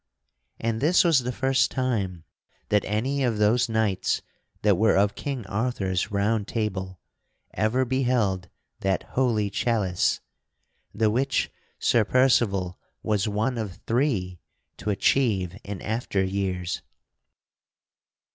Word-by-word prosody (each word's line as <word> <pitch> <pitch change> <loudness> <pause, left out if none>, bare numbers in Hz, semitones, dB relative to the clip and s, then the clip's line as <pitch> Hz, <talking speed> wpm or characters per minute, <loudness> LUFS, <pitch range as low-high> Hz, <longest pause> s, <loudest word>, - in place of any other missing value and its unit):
And 115 0 -1
this 165 +6 +5
was 165 -5 +5
the 125 0 -3
first 135 +2 +2
time 100 -10 -2 0.5
that 105 -1 +3
any 130 +7 0
of 120 -4 +1
those 115 +4 +3
knights 110 -4 0 0.4
that 105 -2 +5
were 110 +2 +3
of 100 +1 +3
King 135 -6 -4
Arthur's 100 -3 -1
Round 105 +1 0
Table 95 -5 -3 0.5
ever 120 +4 +1
beheld 120 -8 0 0.3
that 95 -1 0
holy 110 -6 +1
chalice, 100 -5 +1 0.7
the 110 0 +1
which 135 +5 0 0.3
Sir 115 - +3
Percival 105 -7 +2 0.2
was 105 -2 +1
one 110 +4 -1
of 100 -4 -4
three 115 - 0 0.4
to - - -4
achieve 100 -4 +1
in 100 -2 -6
after 105 -3 -1
years. 95 -2 -2
110 Hz, 120 wpm, -25 LUFS, 95-125 Hz, 0.7 s, this